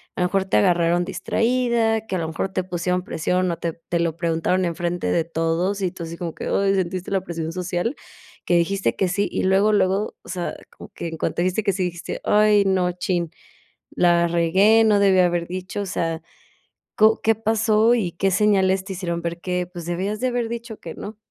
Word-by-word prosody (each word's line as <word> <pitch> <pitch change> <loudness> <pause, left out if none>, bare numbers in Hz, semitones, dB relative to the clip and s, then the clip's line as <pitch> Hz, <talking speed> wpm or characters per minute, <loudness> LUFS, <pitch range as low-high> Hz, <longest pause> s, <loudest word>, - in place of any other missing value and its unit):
a - - -3
lo 180 - +3
mejor 195 +1 0
te 190 - +1
agarraron 170 +7 +3
distraída, 230 +2 0
que 190 - -3
a - - -1
lo 165 - -2
mejor 165 +4 -3
te 185 - 0
pusieron 180 0 -1
presión 180 +2 -1
o 170 - -2
te 170 -1 -3 0.2
te 170 - +1
lo 165 -1 0
preguntaron 170 +2 0
enfrente 175 +1 -2
de 170 - +2
todos? 165 +4 -1
Y 185 - +1
tú 170 -2 -8
así 165 +1 -6
como 170 -2 -5
que, - - -6
ay, 195 0 +1
¿sentiste 185 -1 -2
la 195 -2 0
presión 165 -3 -5
social? 180 - -2 0.5
Que 175 - +1
dijiste 190 +3 +1
que 190 - +1
sí. 200 +2 0
Y - - -1
luego 195 +3 +3
luego, 195 +1 +1
o - - -15
sea, 175 -1 -3 0.2
como - - -11
que - - -5
en 165 -1 -6
cuanto 170 - -2
dijiste 185 +4 0
que 200 -2 +1
sí 185 0 -1
dijiste: 175 -1 -5
"Ay 210 -1 +4
no 185 -2 +2
chin, 175 -2 -2 0.6
la 170 -1 +3
regué, 190 +7 +4
no 210 -2 +4
debí 195 -2 +4
haber 175 -1 +2
dicho". 185 +3 -5
O - - -3
sea, 165 -2 -2 0.8
¿co 220 +1 +4
qué 225 0 +3
pasó 220 +1 +3
y 190 -8 -1
qué 195 +3 0
señales 190 -2 +2
te 195 - -6
hicieron 170 -2 -3
ver 170 0 -4
que, 180 -1 -2
pues, 175 -2 -9
debías 190 +5 -2
de 255 - 0
haber 245 -2 -1
dicho 235 -1 -6
que 165 - -8
no? 210 +1 -8
185 Hz, 215 wpm, -22 LUFS, 170-205 Hz, 0.8 s, Ay